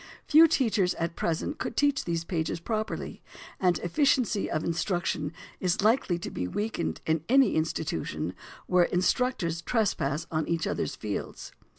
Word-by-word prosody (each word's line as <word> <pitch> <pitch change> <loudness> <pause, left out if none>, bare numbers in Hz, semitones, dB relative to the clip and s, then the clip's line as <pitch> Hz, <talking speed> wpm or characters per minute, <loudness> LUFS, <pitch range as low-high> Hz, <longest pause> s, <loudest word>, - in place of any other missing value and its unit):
Few 320 +2 +7
teachers 220 - +2
at 165 0 -3
present 170 - -2
could - - -4
teach 285 -1 +2
these 170 -1 -1
pages 165 -1 -2
properly; 215 +4 -3 0.4
and 180 -3 +3
efficiency 230 - +1
of 155 - -1
instruction 170 -3 -1 0.3
is 185 +1 0
likely 215 -5 +3
to 190 +5 -6
be 90 - -3
weakened 150 - -3
in 160 -1 +1
any 270 +1 +5
institution 155 - -2 0.3
where 180 -1 +4
instructors 180 -3 0
trespass 170 - 0
on 155 -1 -1
each 165 -1 0
others' - - -2
fields. 105 -2 -5
175 Hz, 145 wpm, -28 LUFS, 160-220 Hz, 0.4 s, Few